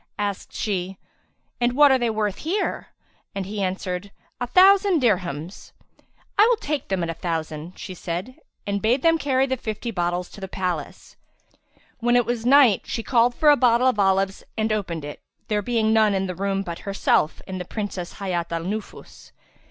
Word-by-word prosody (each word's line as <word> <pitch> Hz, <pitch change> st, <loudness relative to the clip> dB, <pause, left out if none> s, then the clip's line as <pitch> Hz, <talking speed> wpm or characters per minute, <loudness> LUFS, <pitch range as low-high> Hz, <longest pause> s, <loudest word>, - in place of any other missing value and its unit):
Asked 205 Hz, -2 st, -3 dB
she, 190 Hz, -2 st, -3 dB, 0.6 s
"And 240 Hz, 0 st, +1 dB
what 290 Hz, +1 st, +6 dB
are 265 Hz, -, +4 dB
they 240 Hz, -1 st, +1 dB
worth 210 Hz, -2 st, -1 dB
here?" 365 Hz, +7 st, -2 dB, 0.5 s
and 195 Hz, -1 st, -3 dB
he 205 Hz, +1 st, -4 dB
answered 185 Hz, +1 st, -3 dB, 0.3 s
"A 245 Hz, -, -2 dB
thousand 380 Hz, -, +5 dB
dirhams." 180 Hz, -, -2 dB, 0.7 s
"I 425 Hz, -, +8 dB
will 485 Hz, -, +4 dB
take 300 Hz, -, -3 dB
them 190 Hz, -3 st, -1 dB
at 165 Hz, -, -2 dB
a -, -, -4 dB
thousand," 160 Hz, 0 st, -4 dB
she 185 Hz, -, -7 dB
said 180 Hz, +7 st, -5 dB, 0.3 s
and 200 Hz, 0 st, -2 dB
bade 240 Hz, +5 st, +1 dB
them 330 Hz, 0 st, +4 dB
carry 270 Hz, -2 st, +2 dB
the 260 Hz, -1 st, -2 dB
fifty 230 Hz, 0 st, -4 dB
bottles 175 Hz, -2 st, -2 dB
to 205 Hz, -, -12 dB
the 190 Hz, -, -4 dB
palace. 180 Hz, -2 st, -5 dB, 0.8 s
When 240 Hz, +1 st, +2 dB
it 245 Hz, -1 st, +4 dB
was 235 Hz, 0 st, -2 dB
night, 265 Hz, -6 st, +6 dB
she 225 Hz, -, -3 dB
called 240 Hz, 0 st, +3 dB
for 300 Hz, -1 st, +5 dB
a -, -, +6 dB
bottle 245 Hz, -2 st, +3 dB
of 255 Hz, -5 st, +1 dB
olives 195 Hz, 0 st, +1 dB
and 220 Hz, 0 st, +1 dB
opened 170 Hz, -7 st, -3 dB
it, 145 Hz, -, -8 dB, 0.3 s
there 210 Hz, -1 st, +1 dB
being 220 Hz, 0 st, +1 dB
none 215 Hz, -2 st, +4 dB
in 190 Hz, 0 st, 0 dB
the 185 Hz, -, -3 dB
room 195 Hz, +2 st, -1 dB
but 170 Hz, -2 st, -6 dB
herself 195 Hz, -5 st, +1 dB
and 185 Hz, -1 st, -5 dB
the -, -, -3 dB
Princess 195 Hz, -2 st, -5 dB
Hayat 175 Hz, -4 st, -3 dB
al 165 Hz, 0 st, -2 dB
Nufus. 210 Hz, +4 st, -7 dB
205 Hz, 185 wpm, -23 LUFS, 185-245 Hz, 0.8 s, I